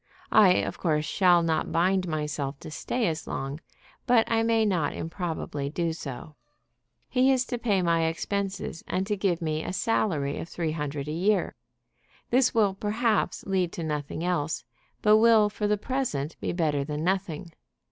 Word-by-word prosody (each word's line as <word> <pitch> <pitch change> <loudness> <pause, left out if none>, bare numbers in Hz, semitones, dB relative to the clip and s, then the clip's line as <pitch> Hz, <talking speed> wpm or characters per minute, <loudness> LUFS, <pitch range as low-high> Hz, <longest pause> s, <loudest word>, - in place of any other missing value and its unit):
I 195 -4 +7
of - - -2
course 155 -3 +1
shall 175 0 +4
not 160 -1 0
bind 185 +2 +2
myself 150 -3 -3
to - - -8
stay 235 +10 -2
as 160 -3 -2
long; 135 +2 -4 0.5
but 245 -3 +5
I 225 0 +3
may 225 -1 +2
not 175 -8 0
improbably 160 -4 -4
do 165 +2 -1
so. 150 -1 -7 0.7
He 260 +1 +3
is 255 -1 +2
to 245 -2 -4
pay 205 -6 +1
my 165 -1 +2
expenses 190 +1 -3
and 185 +1 -1
to 210 +1 -1
give 190 -4 0
me 155 0 -1
a - - -4
salary 160 -10 0
of 170 - -6
three 165 -3 -2
hundred 150 -2 -4
a - - -3
year. 190 +6 +1 0.8
This 250 +1 +4
will, 210 -4 +3
perhaps, 215 +3 0
lead 185 -3 0
to 170 - -4
nothing 150 +1 -3
else, 165 -4 -1 0.4
but 210 0 +6
will 220 -2 +5
for 210 0 -2
the 210 0 +2
present 200 - -2
be - - -2
better 155 -5 0
than 150 +1 -4
nothing. 180 -3 -2
175 Hz, 170 wpm, -27 LUFS, 155-210 Hz, 0.8 s, I